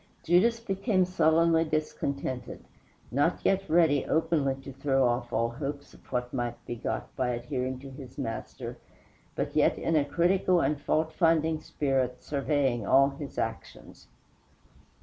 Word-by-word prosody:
Judas 215 Hz, +8 st, +3 dB
became 195 Hz, -3 st, +1 dB
sullenly 165 Hz, -2 st, +3 dB
discontented, 140 Hz, -4 st, -3 dB, 0.5 s
not 145 Hz, +7 st, +1 dB
yet 195 Hz, 0 st, +1 dB
ready 160 Hz, -3 st, +4 dB
openly 160 Hz, -4 st, +1 dB
to 135 Hz, -, -8 dB
throw 135 Hz, -1 st, +2 dB
off 120 Hz, 0 st, -1 dB
all 115 Hz, +1 st, +1 dB
hopes 140 Hz, +3 st, -6 dB
of -, -, -18 dB
what 125 Hz, -1 st, -2 dB
might 120 Hz, -2 st, -2 dB
be 120 Hz, -, -4 dB
got 115 Hz, -, -4 dB
by 130 Hz, -2 st, 0 dB
adhering 125 Hz, +2 st, -3 dB
to 135 Hz, -1 st, -9 dB
his 130 Hz, 0 st, -11 dB
Master, 115 Hz, -5 st, -5 dB, 0.6 s
but -, -, -3 dB
yet -, -, +3 dB
in 165 Hz, -, 0 dB
a 150 Hz, -, +4 dB
critical 180 Hz, +4 st, +2 dB
and 145 Hz, -1 st, 0 dB
fault 160 Hz, +2 st, 0 dB
finding 160 Hz, -2 st, +2 dB
spirit 130 Hz, -5 st, -1 dB
surveying 140 Hz, -4 st, 0 dB
all 135 Hz, +7 st, +5 dB
his 140 Hz, 0 st, -8 dB
actions. 110 Hz, -, -6 dB
140 Hz, 145 wpm, -28 LUFS, 130-165 Hz, 0.6 s, all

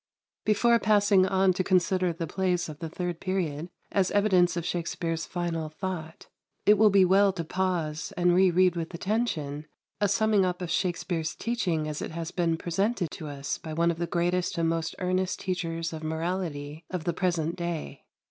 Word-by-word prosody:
127. 215 Hz, -, +5 dB, 0.3 s
Before -, -, -15 dB
passing 205 Hz, -3 st, +4 dB
on 190 Hz, -1 st, +3 dB
to 185 Hz, -, -1 dB
consider 185 Hz, 0 st, +2 dB
the 165 Hz, 0 st, -4 dB
plays 180 Hz, 0 st, 0 dB
of 155 Hz, -1 st, -9 dB
the 165 Hz, -, -5 dB
third 175 Hz, 0 st, -4 dB
period 175 Hz, -4 st, -2 dB, 0.2 s
as 195 Hz, -2 st, +2 dB
evidence 185 Hz, -4 st, +3 dB
of 170 Hz, -, -2 dB
Shakspere's 165 Hz, -1 st, -2 dB
final 170 Hz, -3 st, -3 dB
thought, 160 Hz, -1 st, -6 dB, 0.4 s
it 210 Hz, 0 st, +6 dB
will 215 Hz, -1 st, +7 dB
be 195 Hz, -2 st, +5 dB
well 195 Hz, +2 st, +5 dB
to 170 Hz, -3 st, -3 dB
pause 165 Hz, -3 st, -2 dB
and 175 Hz, 0 st, +4 dB
re 185 Hz, +1 st, +5 dB
read 180 Hz, 0 st, +3 dB
with 170 Hz, +1 st, -4 dB
attention 165 Hz, -8 st, -2 dB, 0.3 s
a 205 Hz, -, +2 dB
summing 210 Hz, 0 st, +3 dB
up 180 Hz, -1 st, -1 dB
of 180 Hz, -2 st, -4 dB
Shakspere's 170 Hz, -3 st, -1 dB
teaching 180 Hz, -10 st, -1 dB
as 150 Hz, -1 st, -4 dB
it -, -, -3 dB
has 165 Hz, 0 st, -5 dB
been 170 Hz, -2 st, 0 dB
presented 185 Hz, +2 st, -1 dB
to 155 Hz, -, -7 dB
us 140 Hz, -1 st, -4 dB
by 160 Hz, -, -7 dB
one 170 Hz, +2 st, +2 dB
of 165 Hz, -, -6 dB
the 170 Hz, -, -1 dB
greatest 175 Hz, +1 st, 0 dB
and 165 Hz, -1 st, +2 dB
most 165 Hz, 0 st, -1 dB
earnest 185 Hz, 0 st, -1 dB
teachers 165 Hz, -3 st, -3 dB
of 160 Hz, -, -6 dB
morality 160 Hz, -2 st, -3 dB
of 180 Hz, -3 st, -3 dB
the 175 Hz, 0 st, 0 dB
present 170 Hz, -2 st, 0 dB
day. 170 Hz, -5 st, -5 dB
175 Hz, 185 wpm, -28 LUFS, 165-185 Hz, 0.4 s, will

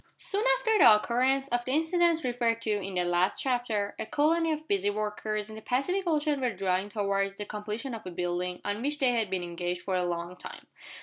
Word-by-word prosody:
Soon 405 Hz, +2 st, +1 dB
after 445 Hz, -4 st, +1 dB
the 215 Hz, -, +9 dB
occurrence 260 Hz, +5 st, +1 dB
of 240 Hz, 0 st, 0 dB
the 255 Hz, -, -2 dB
incidents 330 Hz, +1 st, +2 dB
referred 240 Hz, -2 st, 0 dB
to 220 Hz, -, 0 dB
in 195 Hz, -2 st, -2 dB
the 180 Hz, -, +1 dB
last 175 Hz, +2 st, +1 dB
chapter, 240 Hz, -6 st, -1 dB
a -, -, -2 dB
colony 325 Hz, +4 st, +2 dB
of 310 Hz, 0 st, -4 dB
busy 200 Hz, -3 st, +1 dB
workers 210 Hz, 0 st, -3 dB
in 220 Hz, -, -9 dB
the 220 Hz, -, -8 dB
Pacific 315 Hz, -, -1 dB
Ocean 300 Hz, -3 st, +1 dB
were 250 Hz, -, +1 dB
drawing 190 Hz, +1 st, -1 dB
towards 195 Hz, -2 st, -1 dB
the 205 Hz, -, -4 dB
completion 210 Hz, +5 st, -5 dB
of 225 Hz, -1 st, -7 dB
a -, -, -3 dB
building 180 Hz, +1 st, -3 dB
on 205 Hz, +2 st, -2 dB
which 290 Hz, +3 st, -1 dB
they 265 Hz, -4 st, +3 dB
had 225 Hz, -4 st, 0 dB
been 185 Hz, -1 st, -2 dB
engaged 175 Hz, +1 st, -4 dB
for 190 Hz, -, -3 dB
a 180 Hz, -1 st, +1 dB
long 175 Hz, 0 st, -3 dB
time. -, -, -9 dB
215 Hz, 220 wpm, -28 LUFS, 195-275 Hz, -, the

